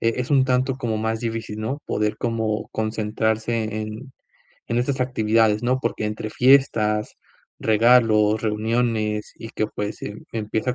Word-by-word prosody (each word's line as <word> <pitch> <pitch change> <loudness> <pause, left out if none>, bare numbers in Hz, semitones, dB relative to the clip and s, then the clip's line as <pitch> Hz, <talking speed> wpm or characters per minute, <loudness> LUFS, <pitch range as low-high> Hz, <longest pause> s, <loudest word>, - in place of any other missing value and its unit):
eh, 115 0 +1
es 125 +3 -3
un 135 -2 +5
tanto 130 0 +1
como 115 -4 -2
más 110 +1 -1
difícil, 115 -2 -4
¿no? 135 +7 -3
Poder 105 0 -1
como 110 -2 -2
concentrarse 110 +1 -1 0.2
en 110 +5 -8 0.5
en 115 - -2
estas 130 +2 -1
actividades 110 -3 +2
¿no? 130 +2 +1
Porque 110 - -2
entre 105 0 -4
fiestas, 110 -5 +3 0.5
regalos, 110 -1 +4
reuniones, 110 -1 -1
y 115 - -8
que 110 - -1
pues, 105 +1 -5
em, 105 - -7
empieza 110 +3 -2
110 Hz, 145 wpm, -23 LUFS, 105-125 Hz, 0.5 s, un